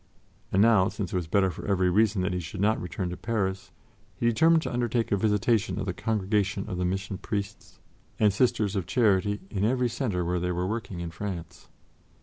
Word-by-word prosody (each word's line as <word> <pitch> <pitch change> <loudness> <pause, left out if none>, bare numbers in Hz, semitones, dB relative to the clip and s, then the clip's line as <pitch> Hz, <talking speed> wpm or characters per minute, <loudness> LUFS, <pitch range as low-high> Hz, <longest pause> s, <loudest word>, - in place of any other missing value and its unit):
And 95 +2 +4
now, 110 -4 +5
since 100 -4 -5
it - - -1
was 90 -3 -1
better 95 +2 +2
for - - -9
every 95 -2 +2
reason 105 -1 +2
that 90 0 -1
he 90 - -1
should 85 0 -7
not 110 +3 +2
return 90 0 -4
to - - -4
Paris, 95 -4 -2 0.5
he - - -3
determined 160 +8 +4
to - - -4
undertake 120 -1 0
a - - +4
visitation 110 +2 +1
of 95 - -2
the 90 - -2
Congregation 105 -1 -1
of 90 -4 -4
the 90 - 0
Mission 95 +1 -3
Priests 100 -1 -5 0.4
and 105 -2 +4
Sisters 110 -3 +1
of 95 -5 -2
Charity 105 -3 +2
in 100 -1 -1
every 125 +2 +2
center 105 -9 -2
where 90 +1 0
they 90 +1 -1
were 90 +1 -1
working 100 -3 -4
in 85 -1 -5
France. 85 -2 -7
100 Hz, 205 wpm, -27 LUFS, 90-110 Hz, 0.5 s, now